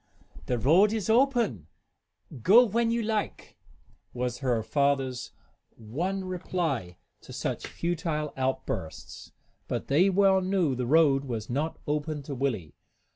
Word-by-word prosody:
"The 125 - 0
road 175 - +4
is 220 -1 -1
open, 235 - +2 0.7
go 225 - +7
when 230 +1 +1
you 230 0 0
like," 215 -1 -3 0.6
was 125 0 -3
her 125 -5 0
father's 135 -2 0 0.5
one 175 - -3
reply 165 - -3 0.2
to - - -13
such - - -4
futile 165 -3 -3
outbursts. 130 0 -4 0.4
But - - -4
they 165 +8 +4
well 195 0 +4
knew 185 -6 +1
the 125 -1 -3
road 140 -2 +4
was 115 -3 -5
not 150 +6 -2
open 150 0 -2
to 140 - -6
Willie. 120 - -2
150 Hz, 130 wpm, -28 LUFS, 130-190 Hz, 0.7 s, go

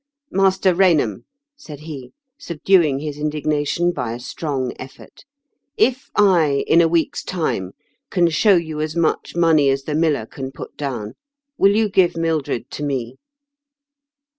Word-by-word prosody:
" 285 - -53
Master 190 -1 +3
Kainham," 165 - +2 0.3
said 150 - -11
he, 145 -5 -9 0.3
subduing 170 - +2
his 150 -1 -5
indignation 150 +3 0
by 115 -9 -4
a 120 - -7
strong 130 -1 -3
efibrt, 130 +1 -12 0.3
" 285 - -55
if 260 +2 -18
I, 170 -9 +3
in 170 - +5
a 165 - +4
week's 165 0 0
time, 125 - -3 0.4
can 175 -2 +2
show 200 +5 +4
you 160 -3 -2
as 155 +1 -3
much 170 -1 -1
money 160 -4 +4
as 135 0 0
the 150 - -4
miller 155 -6 +1
can 135 +3 -7
put - - -10
down, 120 -7 -5 0.4
will 200 -4 +4
you 220 0 +2
give 185 -4 +2
Mildred 160 -7 -2
to 150 - -6
me 130 -4 -3
155 Hz, 155 wpm, -20 LUFS, 140-175 Hz, 0.4 s, in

